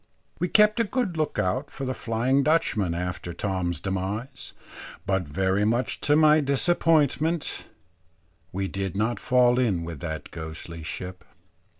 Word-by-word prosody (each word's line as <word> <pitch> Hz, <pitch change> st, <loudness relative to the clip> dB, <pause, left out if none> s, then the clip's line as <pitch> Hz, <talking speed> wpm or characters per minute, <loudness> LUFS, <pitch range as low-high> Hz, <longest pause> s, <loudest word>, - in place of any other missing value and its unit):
We 180 Hz, -, +1 dB
kept 210 Hz, +3 st, +4 dB
a -, -, +4 dB
good 225 Hz, -5 st, -1 dB
look 155 Hz, -2 st, -1 dB
out 130 Hz, +3 st, 0 dB
for 135 Hz, -, -6 dB
the 130 Hz, -, -1 dB
Flying 125 Hz, +3 st, +1 dB
Dutchman 110 Hz, -, +1 dB
after 90 Hz, 0 st, -4 dB
Tom's 90 Hz, -2 st, -2 dB
demise; 100 Hz, +7 st, -4 dB, 0.5 s
but 95 Hz, -3 st, 0 dB
very 95 Hz, +6 st, +1 dB
much 120 Hz, +4 st, 0 dB
to 145 Hz, -, +3 dB
my 155 Hz, 0 st, +6 dB
disappointment, 155 Hz, +2 st, +1 dB, 0.9 s
we 95 Hz, +1 st, -2 dB
did 95 Hz, -1 st, -4 dB
not 115 Hz, +3 st, 0 dB
fall 125 Hz, -1 st, +3 dB
in 100 Hz, -9 st, +1 dB
with 85 Hz, -3 st, -6 dB
that 80 Hz, -1 st, -6 dB
ghostly 80 Hz, +1 st, -7 dB
ship. 90 Hz, +3 st, -7 dB
115 Hz, 140 wpm, -26 LUFS, 90-150 Hz, 0.9 s, my